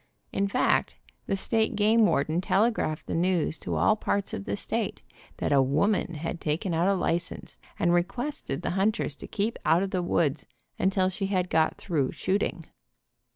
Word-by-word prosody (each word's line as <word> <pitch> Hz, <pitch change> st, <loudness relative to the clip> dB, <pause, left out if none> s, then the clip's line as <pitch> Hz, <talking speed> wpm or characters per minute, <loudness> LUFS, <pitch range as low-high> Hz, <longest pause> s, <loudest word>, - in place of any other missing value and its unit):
In 200 Hz, 0 st, 0 dB
fact 195 Hz, -, +1 dB, 0.3 s
the -, -, +1 dB
state 220 Hz, +3 st, 0 dB
game 215 Hz, +1 st, +4 dB
warden 155 Hz, +3 st, +1 dB
telegraphed 195 Hz, -6 st, +1 dB
the -, -, -4 dB
news 170 Hz, -2 st, +1 dB
to -, -, -3 dB
all 215 Hz, -, +4 dB
parts 200 Hz, -2 st, -2 dB
of 100 Hz, -, -4 dB
the 100 Hz, -, -2 dB
state -, -, -3 dB, 0.3 s
that -, -, -1 dB
a 140 Hz, -1 st, +5 dB
woman 165 Hz, +7 st, +1 dB
had 165 Hz, +2 st, -4 dB
taken 165 Hz, +4 st, -1 dB
out 165 Hz, +3 st, +2 dB
a 200 Hz, -, +3 dB
license, 170 Hz, -1 st, -2 dB, 0.2 s
and 175 Hz, -2 st, +2 dB
requested 195 Hz, -, -2 dB
the -, -, -1 dB
hunters 195 Hz, -4 st, 0 dB
to -, -, -9 dB
keep 215 Hz, +3 st, -2 dB
out 165 Hz, +4 st, +3 dB
of 195 Hz, -, -3 dB
the 185 Hz, -, 0 dB
woods 165 Hz, -4 st, 0 dB, 0.3 s
until 190 Hz, 0 st, +2 dB
she 195 Hz, +1 st, -3 dB
had 185 Hz, -2 st, -1 dB
got 160 Hz, 0 st, +2 dB
through 150 Hz, -8 st, -1 dB
shooting. 190 Hz, -3 st, -1 dB
185 Hz, 175 wpm, -27 LUFS, 160-200 Hz, 0.3 s, a